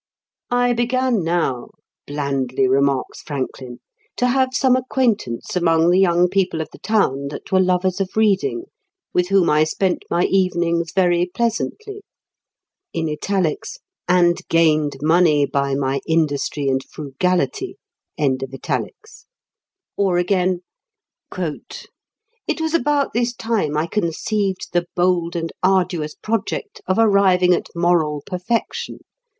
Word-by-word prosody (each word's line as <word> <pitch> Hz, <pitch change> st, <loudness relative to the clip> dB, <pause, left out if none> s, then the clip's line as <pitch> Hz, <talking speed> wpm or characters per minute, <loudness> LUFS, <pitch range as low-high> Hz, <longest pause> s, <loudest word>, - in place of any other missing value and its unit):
"I 245 Hz, 0 st, +2 dB
began 240 Hz, -2 st, +1 dB
now," 165 Hz, -7 st, -1 dB, 0.4 s
blandly 135 Hz, -3 st, -1 dB
remarks 135 Hz, 0 st, +1 dB
Franklin, 130 Hz, -3 st, -6 dB, 0.4 s
"to 250 Hz, -, +2 dB
have 260 Hz, +1 st, +2 dB
some 260 Hz, -1 st, +3 dB
acquaintance 235 Hz, -, -1 dB
among 165 Hz, -1 st, +3 dB
the 180 Hz, -, +4 dB
young 175 Hz, -2 st, +4 dB
people 185 Hz, -3 st, 0 dB
of 160 Hz, -, -4 dB
the -, -, -14 dB
town 140 Hz, -11 st, 0 dB
that 145 Hz, -, -8 dB
were 190 Hz, -, +4 dB
lovers 185 Hz, +1 st, +1 dB
of 190 Hz, +2 st, -4 dB
reading, 220 Hz, -, +2 dB, 0.5 s
with 180 Hz, 0 st, +2 dB
whom 195 Hz, -2 st, +3 dB
I 150 Hz, +1 st, +4 dB
spent 180 Hz, +3 st, -1 dB
my 175 Hz, -, +1 dB
evenings 170 Hz, -3 st, +1 dB
very 175 Hz, -1 st, +2 dB
pleasantly; 400 Hz, -, -3 dB, 0.9 s
and 175 Hz, -, -1 dB
gained 155 Hz, -4 st, +2 dB
money 160 Hz, -2 st, +4 dB
by 140 Hz, 0 st, -1 dB
my 135 Hz, 0 st, -1 dB
industry 150 Hz, -3 st, 0 dB
and 130 Hz, 0 st, +1 dB
frugality." 150 Hz, +1 st, -2 dB, 2.2 s
Or 190 Hz, -3 st, +2 dB
again: 180 Hz, 0 st, +1 dB, 0.8 s
"It 470 Hz, -7 st, -7 dB
was 320 Hz, 0 st, -1 dB
about 295 Hz, -3 st, +1 dB
this 240 Hz, +1 st, 0 dB
time 210 Hz, -12 st, -1 dB
I 155 Hz, -, +1 dB
conceived 195 Hz, +2 st, -2 dB
the 175 Hz, 0 st, +1 dB
bold 175 Hz, -1 st, +1 dB
and 165 Hz, -1 st, -3 dB
arduous 180 Hz, -5 st, +1 dB
project 225 Hz, -, -3 dB
of 185 Hz, -, +1 dB
arriving 195 Hz, -5 st, +4 dB
at -, -, -1 dB
moral 165 Hz, -4 st, +1 dB
perfection.... 195 Hz, +5 st, -3 dB
180 Hz, 115 wpm, -20 LUFS, 155-205 Hz, 2.2 s, the